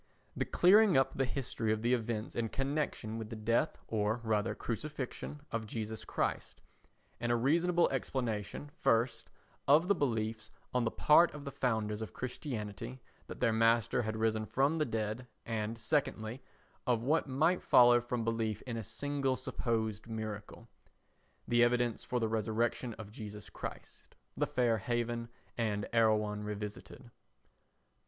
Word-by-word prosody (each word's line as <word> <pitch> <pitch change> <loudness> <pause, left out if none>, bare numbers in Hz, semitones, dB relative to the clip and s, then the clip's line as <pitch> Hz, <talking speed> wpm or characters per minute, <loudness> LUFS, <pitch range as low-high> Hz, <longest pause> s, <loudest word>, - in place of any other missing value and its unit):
The - - 0
clearing 195 -1 +6
up 135 0 +3
the 135 - +1
history 125 -4 -2
of 110 0 -1
the 120 +2 +3
events 115 -2 -2
in 115 -1 -1
connection 135 -5 -2
with 110 -1 -6
the 115 - -5
death, 110 +2 +1
or 110 +1 0
rather 110 -1 0
crucifixion, 145 +4 -5
of 115 -1 -2
Jesus 110 0 -4
Christ; - - -2 0.6
and 120 0 0
a - - +4
reasonable 170 +8 +3
explanation, 125 0 -3
first, 115 +2 +1 0.4
of 155 +5 +6
the 200 - +5
belief 110 - -1 0.2
on 125 -1 +2
the - - +2
part 160 +8 +5
of 145 0 -8
the 140 - -4
founders 110 -5 -1
of 110 - -6
Christianity 125 -2 -5 0.3
that - - -9
their 115 -3 +3
master 115 +1 +3
had 110 -1 -3
risen 110 -1 +1
from 140 +5 +2
the 155 - +2
dead 110 +1 -3 0.2
and, 110 0 -2
secondly, 115 0 -1 0.5
of 120 -2 +2
what 150 +4 +2
might 160 +7 +2
follow 120 -1 +6
from 120 -1 -2
belief 115 -2 -1
in 120 -3 -4
a 115 - -3
single 140 +3 -1
supposed 110 -4 -2
miracle. 110 -2 -6 0.8
[The 120 0 +4
Evidence 120 -1 +2
for 125 - -1
the 115 - +1
Resurrection 110 +2 -1
of 105 -2 -9
Jesus 105 -1 -8
Christ, - - -8 0.2
The - - 0
Fair 120 -3 +2
Haven 120 +1 -2 0.3
and 105 -3 0
Erewhon 105 -2 +2
Revisited.] 105 0 -6
4. - - -16
115 Hz, 150 wpm, -33 LUFS, 110-130 Hz, 0.8 s, clearing